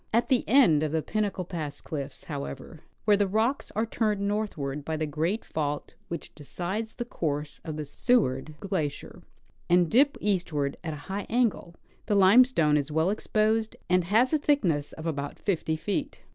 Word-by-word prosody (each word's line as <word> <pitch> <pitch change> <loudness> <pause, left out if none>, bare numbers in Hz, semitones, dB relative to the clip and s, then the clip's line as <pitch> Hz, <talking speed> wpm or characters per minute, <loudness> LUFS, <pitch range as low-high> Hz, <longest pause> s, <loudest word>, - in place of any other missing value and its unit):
At 235 +2 +2
the 255 -2 +3
end 200 - +6
of 155 -1 -1
the 160 -1 0
Pinnacle 205 -4 -2
pass 155 -5 -5
cliffs, 140 -3 -6
however, 140 0 -6 0.3
where 210 - +6
the 200 0 +2
rocks 220 +7 0
are 220 +2 +1
turned 215 -2 0
northward 200 -9 -2
by 160 +2 -3
the 155 - -1
great 160 +8 -1
fault 145 -2 -3
which 170 - -6
decides 185 +9 -5
the 240 - -4
course 150 -8 -3
of 155 -2 -5
the 155 - -4
Seward 150 - +1
glacier, 165 -8 -3 0.5
and 175 -1 +4
dip 275 +5 +4
eastward 165 -8 0
at 160 -2 -3
a 145 - -11
high 195 +1 -4
angle, 220 -7 0 0.3
the 205 - +2
lime 200 +6 +7
stone 155 - +2
is 145 +1 -2
well 160 +5 +2
exposed, 215 +1 0 0.2
and 180 -1 +3
has 225 - +3
a 310 - +3
thickness 180 - +1
of 160 - -9
about 145 -3 -3
50 165 -5 -1
feet. 205 - -3
175 Hz, 175 wpm, -27 LUFS, 150-215 Hz, 0.5 s, lime